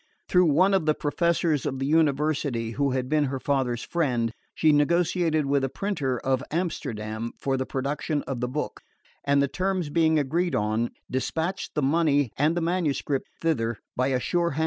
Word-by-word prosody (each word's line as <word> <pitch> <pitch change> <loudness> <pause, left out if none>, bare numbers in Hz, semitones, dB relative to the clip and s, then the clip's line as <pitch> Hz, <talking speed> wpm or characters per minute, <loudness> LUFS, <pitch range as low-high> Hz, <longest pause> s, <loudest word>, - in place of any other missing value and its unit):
Through 180 0 +4
one 175 +6 +4
of 185 -5 +1
the 155 - +4
professors 165 -1 +1
of 135 - -2
the 135 - -2
University, 145 -5 +1
who 140 +4 0
had 130 -1 -1
been 150 +1 +2
her 135 -1 -3
father's 130 -4 0
friend, 125 -9 0 0.2
she 155 - +4
negotiated 160 +1 +2
with 140 0 +1
a 135 - 0
printer 145 -9 -2
of 130 +2 0
Amsterdam 115 -10 -3
for 135 -1 0
the 130 0 -2
production 145 +2 -2
of 130 -2 -4
the 125 - -1
book, 145 +5 -4 0.4
and 140 0 +3
the - - +2
terms 185 -1 -1
being 160 0 +3
agreed 165 +5 0
on, 110 +3 0 0.2
despatched 160 +8 -2
the 150 - 0
money 145 -3 +2
and 155 +4 +2
the - - +1
manuscript 160 -5 -1
thither 115 -9 0 0.2
by 130 +1 +1
a 130 -2 +1
sure 170 +6 0
hand. 150 - -4
145 Hz, 180 wpm, -26 LUFS, 130-165 Hz, 0.4 s, Through